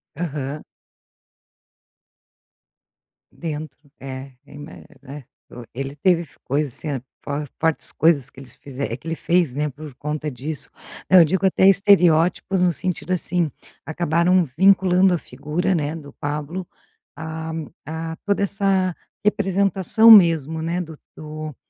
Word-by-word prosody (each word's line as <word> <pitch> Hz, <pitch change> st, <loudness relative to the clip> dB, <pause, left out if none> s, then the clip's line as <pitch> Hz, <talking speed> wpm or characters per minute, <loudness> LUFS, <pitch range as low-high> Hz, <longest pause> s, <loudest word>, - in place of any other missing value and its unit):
Aham. 150 Hz, -2 st, -4 dB, 2.7 s
Dentro, 155 Hz, -3 st, -6 dB, 0.2 s
é, 135 Hz, 0 st, -8 dB
eu -, -, -16 dB
ima 145 Hz, +2 st, -10 dB, 0.3 s
né. 145 Hz, +1 st, -10 dB, 0.5 s
Ele 135 Hz, +2 st, -5 dB
teve 170 Hz, +1 st, +2 dB, 0.2 s
coisas 140 Hz, -1 st, -2 dB
assim, 140 Hz, -5 st, -4 dB, 0.6 s
fortes 160 Hz, -1 st, 0 dB
coisas 150 Hz, -5 st, +2 dB
que 135 Hz, -, -15 dB
eles 130 Hz, -3 st, -12 dB
que -, -, -14 dB, 0.4 s
ele 165 Hz, -, -2 dB
fez, 170 Hz, -6 st, +1 dB
né, 150 Hz, +1 st, -1 dB
por 145 Hz, +1 st, -10 dB
conta 150 Hz, +2 st, -4 dB
disso. 145 Hz, +3 st, -5 dB, 0.4 s
Não, 185 Hz, -, +8 dB
eu 170 Hz, -, +8 dB
digo 190 Hz, +5 st, 0 dB
até 190 Hz, 0 st, +4 dB
estereótipos 185 Hz, -2 st, +4 dB
no 180 Hz, -1 st, +3 dB
sentido 185 Hz, +1 st, -3 dB
assim, 175 Hz, -2 st, -1 dB, 0.4 s
acabaram 170 Hz, +1 st, +1 dB
vinculando 190 Hz, -1 st, +4 dB
a -, -, +1 dB
figura, 150 Hz, +7 st, -3 dB
né, 155 Hz, -2 st, -1 dB
do 145 Hz, -3 st, -10 dB
Pablo, 150 Hz, +5 st, -5 dB, 0.5 s
a 160 Hz, 0 st, -6 dB, 0.3 s
a 160 Hz, +2 st, -5 dB
toda 200 Hz, -1 st, +1 dB
essa 195 Hz, -2 st, +1 dB, 0.3 s
representação 200 Hz, +2 st, +3 dB
mesmo, 165 Hz, -6 st, +6 dB
né, 170 Hz, +2 st, -2 dB
do 160 Hz, -3 st, -9 dB, 0.2 s
do 155 Hz, -1 st, -7 dB
160 Hz, 125 wpm, -22 LUFS, 150-180 Hz, 2.7 s, Não